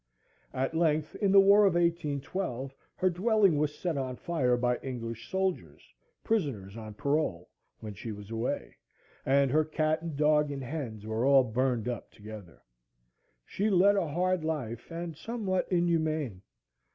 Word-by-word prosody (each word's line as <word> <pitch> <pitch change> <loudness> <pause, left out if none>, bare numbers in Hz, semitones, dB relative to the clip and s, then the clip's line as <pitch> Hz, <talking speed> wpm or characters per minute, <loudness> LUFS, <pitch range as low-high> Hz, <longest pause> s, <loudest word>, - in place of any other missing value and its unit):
At 135 +4 -1
length, 155 -2 +1
in 200 -3 +2
the 195 - +8
war 200 +2 +7
of 180 - +1
1812, 155 -4 -1 0.2
her 185 - +2
dwelling 200 -1 +3
was 150 0 -1
set 170 -6 -2
on 130 -1 -3
fire 130 -6 0
by 125 0 +1
English 115 -3 -6
soldiers, 190 -1 -3 0.3
prisoners 135 - -1
on 110 -2 -8
parole, 140 - -1 0.3
when 105 -2 -6
she 110 +3 -7
was 105 0 -9
away, 115 - -3 0.5
and 135 0 +3
her 155 +2 +4
cat 155 0 0
and 165 -4 -5
dog 150 0 +3
and 135 -1 -5
hens 120 -7 -5
were 110 +2 -1
all 135 0 +6
burned 125 -1 0
up 120 -3 -4
together. 105 -4 -12 0.8
She 205 +3 -1
led 200 +1 +5
a 195 -4 +1
hard 180 +3 0
life, 130 -8 -4
and 170 -1 -5
somewhat 200 -1 -2
inhumane. 160 - 0
150 Hz, 150 wpm, -29 LUFS, 120-175 Hz, 0.8 s, the